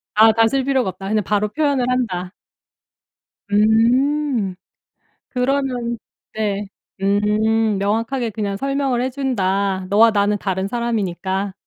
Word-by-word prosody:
아 220 +1 +7
다스릴 225 +4 +2
필요가 265 -6 +1
없다. 195 +1 -7
그냥 215 0 +1
바로 210 +2 0
표현을 285 -1 0
한다. 185 -8 -1 1.2
음. 230 +1 +2 0.7
그러면 250 -2 -1 0.4
네 210 -2 -2 0.4
음 210 +2 +2
명확하게 230 +5 -1
그냥 200 -2 -3
설명을 275 0 -1
해 260 - -1
준다. 200 -8 -1
너와 220 +3 +5
나는 205 0 +1
다른 190 -1 -2
사람이니까. 200 -4 -2
220 Hz, 240 characters per minute, -20 LUFS, 200-250 Hz, 1.2 s, 아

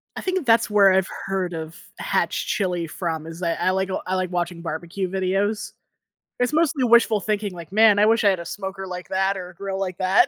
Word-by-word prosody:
I - - -5
think 370 -5 -1
that's 230 -1 +4
where 200 -2 +6
I've 190 0 +2 0.2
heard 190 -2 -2
of 160 0 -6 0.2
hatch - - -1
chili 180 -5 -1
from 160 -1 -4
is 165 +1 -8
that 170 -2 -1
I - - +3
like 190 0 -1 0.2
I 185 - 0
like 185 -1 -1
watching 175 -1 -2
barbecue 170 +3 -4
videos. 195 +3 -1 0.7
It's 250 +3 +1
mostly 305 -4 +2
wishful 230 -2 +5
thinking 205 +1 -2
like, 170 -1 -10
"Man, 215 -1 +6
I 210 - +6
wish 225 +1 +3
I 205 - +6
had 190 -2 +1
a 170 - -7
smoker 190 +1 -6
like 180 0 -7
that 190 +1 +1
or 180 -1 -6
a 180 - -16
grill 195 +1 -4
like 185 -2 -3
that." 185 +1 +4
190 Hz, 220 wpm, -23 LUFS, 180-210 Hz, 0.7 s, where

